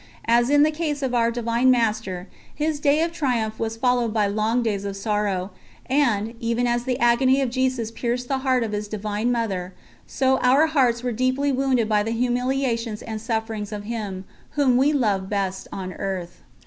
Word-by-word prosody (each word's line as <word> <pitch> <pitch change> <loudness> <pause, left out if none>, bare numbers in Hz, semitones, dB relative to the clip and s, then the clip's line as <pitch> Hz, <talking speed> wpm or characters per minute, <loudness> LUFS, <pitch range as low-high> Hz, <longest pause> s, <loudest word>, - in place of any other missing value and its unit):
As 240 +2 +3
in 290 0 +5
the 310 - +3
case 300 -2 -3
of 255 -2 -1
Our 235 -1 +3
Divine 235 +1 +1
Master, 210 -7 0 0.3
his 305 0 -1
day 295 +2 +3
of 335 - -1
triumph 240 -9 -1
was 225 0 -2
followed 245 -1 +1
by 215 -1 +2
long 215 +4 0
days 205 -3 -1
of 200 -1 -4
sorrow; 200 -2 -1 0.3
and, 235 -6 +1
even 235 0 0
as 240 0 0
the 255 -1 0
agony 255 +2 +3
of 265 -3 0
Jesus 255 -3 -1
pierced 245 +1 -2
the 270 0 0
heart 260 -2 +1
of 220 - -3
His 210 0 -3
divine 215 +2 -2
Mother, 195 -6 -2 0.3
so 265 0 +1
our 265 +5 +4
hearts 255 -7 +2
were 250 - -1
deeply 255 +4 +1
wounded 260 -4 +1
by 210 -1 +2
the 225 +2 -2
humiliations 245 -2 -1
and 220 -1 -5
sufferings 225 -2 -3
of 205 -1 -5
him, 205 -4 -5 0.3
whom 270 -4 +4
we 270 +4 +4
loved 205 -9 0
best 195 -2 -2
on 185 -1 -5
earth. 185 -3 -5
235 Hz, 185 wpm, -23 LUFS, 210-260 Hz, 0.3 s, in